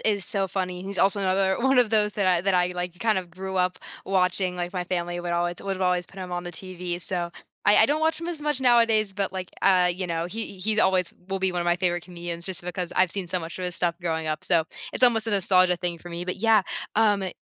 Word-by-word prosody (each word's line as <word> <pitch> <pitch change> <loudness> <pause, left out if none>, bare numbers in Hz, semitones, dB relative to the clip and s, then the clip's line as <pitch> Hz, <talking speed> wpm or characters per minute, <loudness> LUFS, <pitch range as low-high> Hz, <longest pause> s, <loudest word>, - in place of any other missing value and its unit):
is 200 -3 +1
so 195 -3 +2
funny, 180 -1 -4
he's 195 +1 -4
also 200 +1 +4
another 190 0 +1
one 265 +1 +3
of 240 -3 +3
those 210 -2 +2
that 200 -2 0
I 180 -2 +3
that 195 +1 0
I, 180 0 +2
like, 180 0 -5
kind 220 -1 +1
of 180 -2 -8
grew 190 +2 -6
up 180 0 0 0.3
watching, 180 -1 0
like, 175 0 -4
my 180 -2 -2
family 175 -1 -3
would 175 0 -4
always 175 0 -1
would 195 -1 -4
always 180 -1 +1
put 195 - -15
him 180 -1 -7
on 175 0 -3
the 175 - -6
TV. 180 -1 -5
So 175 -1 -1 0.4
I 205 - +6
I - - +6
don't 295 +2 0
watch 320 +1 0
him 335 - -5
as 320 -4 -1
much 295 -3 +1
nowadays, 230 -5 +3
but, 195 -1 -3
like, 185 -1 -6
uh, 180 -2 +4
you 185 0 -4
know, 165 0 -2
he 205 0 -6
he's 215 +3 +1
always 185 -2 +2
will 195 - -2
be 190 -1 0
one 175 - -2
of - - -2
my 175 0 +2
favorite 175 -1 -1
comedians 170 -1 -6
just 190 -2 +3
because 180 0 -3
I've 185 -2 +3
seen 190 -2 -3
so 185 - -1
much 165 -1 -8
of 185 - -4
his 180 -1 +1
stuff 175 -1 +1
growing 160 -2 -2
up, 155 0 -3
so, 170 -3 +5 0.3
it's - - -3
almost 230 -2 +4
a - - -1
nostalgia 185 -2 +4
thing 175 -1 -3
for 175 - -11
me, 170 +1 -4
but 180 - -3
yeah, 220 -1 +3 0.3
um, 210 -3 +3
e 190 - -3
185 Hz, 270 wpm, -25 LUFS, 175-200 Hz, 0.4 s, I